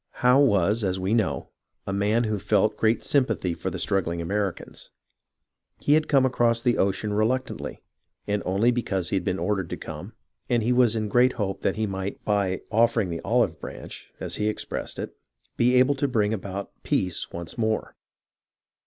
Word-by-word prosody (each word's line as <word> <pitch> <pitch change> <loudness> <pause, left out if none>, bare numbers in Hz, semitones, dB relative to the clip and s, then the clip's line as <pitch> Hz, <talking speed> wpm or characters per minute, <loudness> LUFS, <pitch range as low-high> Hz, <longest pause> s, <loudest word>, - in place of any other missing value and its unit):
Howe 125 +2 +6
was, 105 -4 +3
as 95 -1 0
we 95 +3 0
know, 110 -4 0 0.4
_a 100 - -2
man 105 +4 +2
who 110 -2 -1
felt 105 +2 +2
great 110 +1 +1
sym 140 -3 +3
pathy 95 -7 -2
for - - -3
the - - -5
struggling 85 -3 0
Americans. 100 +2 -3 0.9
He 145 - +2
had 155 0 +3
come 135 -3 +4
across 120 -2 +2
the 120 0 +1
ocean 100 +2 0
reluctantly, 120 +5 -1 0.4
and 105 0 -1
only 100 +6 +2
because 95 -8 -1
he - - +1
had 95 - 0
been 90 0 -1
ordered 95 -4 -1
to - - -4
come, - - -8 0.4
and 120 -2 +2
he 120 +3 +2
was 120 -3 +4
in 110 -1 -1
great 125 +4 +4
hope 95 -2 -3
that 95 - 0
he 110 +1 0
might, 95 -1 -5
by 100 -3 +1
" - - -36
offering 115 -6 +2
the 85 - -4
olive - - +1
branch," - - -9
as - - -2
he 105 - 0
expressed 110 - -4
it, - - -6 0.4
be 125 +2 +3
able 130 +3 +5
to 140 +1 0
bring 110 -4 +1
about 100 -1 -5
joeace 90 -2 -1
once 85 -1 -6
more. 110 -2 -1
105 Hz, 190 wpm, -25 LUFS, 95-120 Hz, 0.9 s, Howe